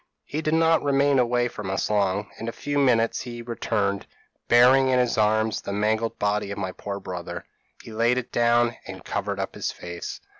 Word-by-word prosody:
p> 145 Hz, -, -5 dB
"He -, -, 0 dB
did 155 Hz, 0 st, +1 dB
not 165 Hz, 0 st, +4 dB
remain 140 Hz, -1 st, +3 dB
away 120 Hz, 0 st, +2 dB
from 105 Hz, -5 st, -6 dB
us 95 Hz, -, -1 dB
long; 100 Hz, -1 st, 0 dB
in 115 Hz, -, -5 dB
a -, -, -1 dB
few 145 Hz, +4 st, -2 dB
minutes 115 Hz, -4 st, +2 dB
he 120 Hz, -1 st, -7 dB
returned, 105 Hz, -4 st, -2 dB, 0.4 s
bearing 130 Hz, +3 st, +6 dB
in 130 Hz, -, +3 dB
his 125 Hz, -2 st, +2 dB
arms 110 Hz, 0 st, +1 dB
the 100 Hz, -, -5 dB
mangled 110 Hz, +2 st, 0 dB
body 105 Hz, 0 st, 0 dB
of 100 Hz, -, -5 dB
my 95 Hz, -2 st, -3 dB
poor 100 Hz, +1 st, -6 dB
brother; 90 Hz, -3 st, -6 dB, 0.4 s
he -, -, -10 dB
laid 115 Hz, +3 st, +2 dB
it 125 Hz, -, -4 dB
down, 120 Hz, 0 st, +2 dB
and -, -, -9 dB
covered -, -, -3 dB
up -, -, -3 dB
his -, -, -3 dB
face. 85 Hz, -1 st, -7 dB
115 Hz, 200 wpm, -25 LUFS, 105-125 Hz, 0.4 s, bearing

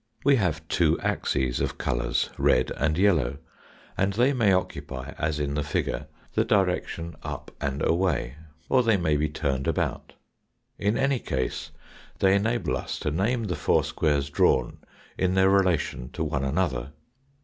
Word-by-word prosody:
We 140 Hz, 0 st, +5 dB
have 80 Hz, -6 st, -1 dB
two -, -, +2 dB
axes 65 Hz, -2 st, 0 dB
of -, -, -2 dB
colours -, -, -1 dB
red 65 Hz, -, +3 dB
and 75 Hz, +2 st, 0 dB
yellow 80 Hz, -10 st, +2 dB, 0.6 s
and 95 Hz, +1 st, +1 dB
they 125 Hz, +7 st, +3 dB
may 115 Hz, -6 st, +3 dB
oc 90 Hz, -1 st, +1 dB
cupy 65 Hz, -1 st, -7 dB
as 75 Hz, -1 st, -1 dB
in 70 Hz, -1 st, -1 dB
the 75 Hz, -, 0 dB
figure 70 Hz, 0 st, -2 dB, 0.3 s
the -, -, +2 dB
direction 90 Hz, -4 st, 0 dB
up -, -, -6 dB
and 70 Hz, 0 st, -1 dB
away, 85 Hz, -6 st, 0 dB, 0.3 s
or 130 Hz, -, +4 dB
they 115 Hz, -4 st, +3 dB
may 80 Hz, -4 st, +1 dB
be 75 Hz, +1 st, +1 dB
turned 70 Hz, -3 st, -2 dB
about; -, -, -2 dB, 0.7 s
in 105 Hz, +2 st, +1 dB
any 135 Hz, -1 st, +1 dB
case 65 Hz, -, -3 dB, 0.5 s
they 95 Hz, -1 st, +4 dB
enable 110 Hz, +4 st, +1 dB
us -, -, -5 dB
to 75 Hz, -, -1 dB
name 115 Hz, -, 0 dB
the 90 Hz, -5 st, -2 dB
four 75 Hz, -, +2 dB
squares 70 Hz, -2 st, 0 dB
drawn -, -, +2 dB, 0.4 s
in 95 Hz, 0 st, +1 dB
their 95 Hz, 0 st, +5 dB
relation 90 Hz, -10 st, +1 dB
to -, -, -2 dB
one 70 Hz, -, -1 dB
another. 70 Hz, -3 st, -1 dB
80 Hz, 160 wpm, -26 LUFS, 70-100 Hz, 0.7 s, We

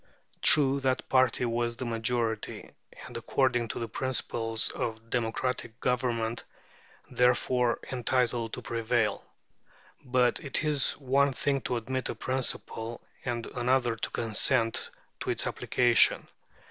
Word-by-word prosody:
True, 140 Hz, -2 st, +5 dB
that 130 Hz, -1 st, -1 dB
party 130 Hz, -1 st, +3 dB
was 120 Hz, 0 st, -1 dB
the 130 Hz, -, -5 dB
majority, 115 Hz, -1 st, -2 dB, 0.3 s
and, -, -, -11 dB
according 125 Hz, -3 st, +1 dB
to -, -, -5 dB
the 115 Hz, -, -3 dB
principles 115 Hz, -3 st, 0 dB
of 115 Hz, 0 st, -5 dB
democratic 120 Hz, 0 st, -2 dB
government, 120 Hz, -2 st, -1 dB, 0.7 s
therefore 125 Hz, 0 st, +2 dB
entitled 120 Hz, -2 st, 0 dB
to -, -, -6 dB
prevail. 115 Hz, -1 st, 0 dB, 0.8 s
But 125 Hz, -1 st, +2 dB
it 145 Hz, +1 st, -2 dB
is 150 Hz, -3 st, +1 dB
one 140 Hz, 0 st, +1 dB
thing 135 Hz, +1 st, 0 dB
to 125 Hz, -, 0 dB
admit 130 Hz, +3 st, -3 dB
a -, -, -3 dB
principle 120 Hz, -3 st, -2 dB, 0.2 s
and 120 Hz, -2 st, -2 dB
another 125 Hz, -1 st, +1 dB
to -, -, -4 dB
consent 115 Hz, +1 st, +1 dB, 0.3 s
to -, -, -4 dB
its -, -, 0 dB
application. 120 Hz, -2 st, +3 dB
120 Hz, 120 wpm, -29 LUFS, 115-130 Hz, 0.8 s, True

